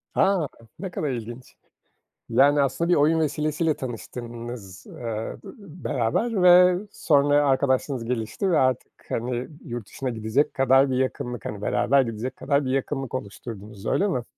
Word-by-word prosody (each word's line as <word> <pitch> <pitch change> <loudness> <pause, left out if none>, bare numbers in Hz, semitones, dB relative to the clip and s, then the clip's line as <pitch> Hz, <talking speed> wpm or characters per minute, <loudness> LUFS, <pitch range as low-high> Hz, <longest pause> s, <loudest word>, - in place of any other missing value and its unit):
A, 190 -6 +3 0.3
Ne 190 -1 -5
kadar 155 -4 -2
ilginç. 120 +1 -7 0.7
Yani, 140 +5 +5
aslında 140 +5 0
bir 175 - +5
oyun 155 +3 +3
vesilesiyle 155 +1 0
tanıştınız 120 -4 -7
d - - -14
eee, 115 -2 -5 0.5
beraber 180 - 0
ve 180 0 +7 0.2
sonra 145 -3 +3
arkadaşlığınız 130 -2 +1
gelişti 120 - -2
ve 170 - +4
artık, 130 -1 +1 0.2
hani, 120 +1 -2 0.2
yurt 120 -6 -6
dışına 130 -1 -4
gidecek 110 +5 0
kadar 135 0 +4
bir 125 - 0
yakınlık, 125 -2 -2
hani, 105 -1 -5
beraber 135 +5 +3
gidecek 120 +1 -4
kadar 140 0 0
bir 130 - -1
yakınlık 135 -1 -2
oluşturdunuz 105 -3 -7
öyle 200 - +2
mi? 125 - -1
130 Hz, 145 wpm, -25 LUFS, 120-145 Hz, 0.7 s, ve